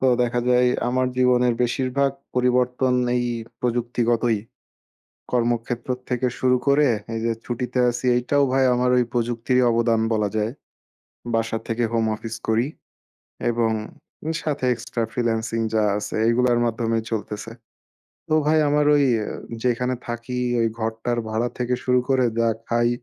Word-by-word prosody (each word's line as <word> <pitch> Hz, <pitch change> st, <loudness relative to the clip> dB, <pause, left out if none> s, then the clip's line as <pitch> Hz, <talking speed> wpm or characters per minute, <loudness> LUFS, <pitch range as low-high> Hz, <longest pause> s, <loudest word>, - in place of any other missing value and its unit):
তো 130 Hz, -, +2 dB, 0.2 s
দেখা 120 Hz, 0 st, 0 dB
যায় 125 Hz, 0 st, +4 dB, 0.2 s
আমার 130 Hz, +1 st, +1 dB
জীবনের 125 Hz, -1 st, +3 dB
বেশিরভাগ 130 Hz, +3 st, +1 dB, 0.2 s
পরিবর্তন 125 Hz, 0 st, +2 dB, 0.2 s
এই 120 Hz, -, 0 dB, 0.4 s
প্রযুক্তিগতই। 120 Hz, -1 st, +1 dB, 0.9 s
কর্মক্ষেত্র 120 Hz, 0 st, -1 dB, 0.2 s
থেকে 125 Hz, +1 st, 0 dB
শুরু 125 Hz, -1 st, +3 dB
করে, 140 Hz, +1 st, +5 dB, 0.3 s
এইযে 115 Hz, +1 st, 0 dB
ছুটিতে 125 Hz, +1 st, -2 dB
আছি, 120 Hz, +1 st, -4 dB
এইটাও 140 Hz, +4 st, +2 dB
ভাই 135 Hz, 0 st, +3 dB
আমার 125 Hz, +1 st, +1 dB
ওই 125 Hz, -, +4 dB
প্রযুক্তিরই 120 Hz, +1 st, +1 dB
অবদান 115 Hz, -1 st, +2 dB
বলা 105 Hz, -2 st, +1 dB
যায়। 110 Hz, +2 st, 0 dB, 0.8 s
বাসা 115 Hz, 0 st, 0 dB
থেকে 115 Hz, +1 st, -1 dB
হোম 115 Hz, -1 st, +2 dB
অফিস 115 Hz, +1 st, -6 dB
করি 115 Hz, +4 st, +2 dB, 0.8 s
এবং 115 Hz, -1 st, +1 dB, 0.7 s
সাথে 145 Hz, -3 st, -3 dB
এক্সট্রা 120 Hz, 0 st, -4 dB
ফ্রিল্যান্সিং 115 Hz, -2 st, -1 dB
যা 110 Hz, -1 st, +3 dB
আছে 105 Hz, -, -4 dB
এইগুলার 120 Hz, 0 st, +3 dB
মাধ্যমেই 115 Hz, -1 st, -1 dB
চলতেছে। 110 Hz, 0 st, -4 dB, 0.8 s
তো 155 Hz, -, +2 dB
ভাই 155 Hz, +1 st, +4 dB
আমার 150 Hz, 0 st, +2 dB
ওই 145 Hz, -, +4 dB, 0.6 s
যেখানে 125 Hz, +1 st, +1 dB
থাকি, 120 Hz, +2 st, -4 dB, 0.2 s
ওই 115 Hz, -, +3 dB
ঘরটার 115 Hz, +2 st, -2 dB
ভাড়া 110 Hz, +2 st, 0 dB
থেকে 125 Hz, 0 st, 0 dB
শুরু 125 Hz, 0 st, +3 dB
করে, 130 Hz, -2 st, +3 dB
যা 115 Hz, 0 st, +3 dB, 0.2 s
খাই 120 Hz, 0 st, +2 dB
120 Hz, 135 wpm, -23 LUFS, 115-125 Hz, 0.9 s, করে